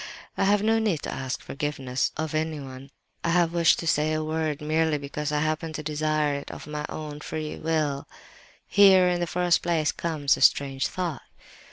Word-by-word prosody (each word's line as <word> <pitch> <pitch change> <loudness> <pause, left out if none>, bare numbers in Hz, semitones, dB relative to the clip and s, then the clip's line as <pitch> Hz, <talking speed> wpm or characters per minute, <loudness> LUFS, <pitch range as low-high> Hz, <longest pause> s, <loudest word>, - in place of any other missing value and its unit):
I - - +1
have 205 +1 +3
no 225 +1 +3
need 205 -9 0
to - - -4
ask 130 -1 -4
forgiveness 135 -3 -2
of 155 0 -3
anyone. 145 -4 -4 0.3
I 170 +1 +3
wish 170 0 +3
to - - -6
say 155 -1 +2
a 155 0 -1
word 155 -1 -2
merely 155 0 +1
because 145 +1 -4
I 150 0 +1
happen 155 +1 -1
to 155 - -5
desire 155 0 0
it 140 0 -5
of - - -8
my 150 0 -5
own 150 -1 -6
free 155 0 -5
will. 155 -3 -1 0.6
"Here, 190 -2 +6
in 175 -1 +1
the 175 - -1
first 175 0 +2
place, 165 -4 +1
comes 155 -4 0
a - - -8
strange 135 -1 +3
thought! 175 -7 -3
155 Hz, 185 wpm, -26 LUFS, 145-165 Hz, 0.6 s, Here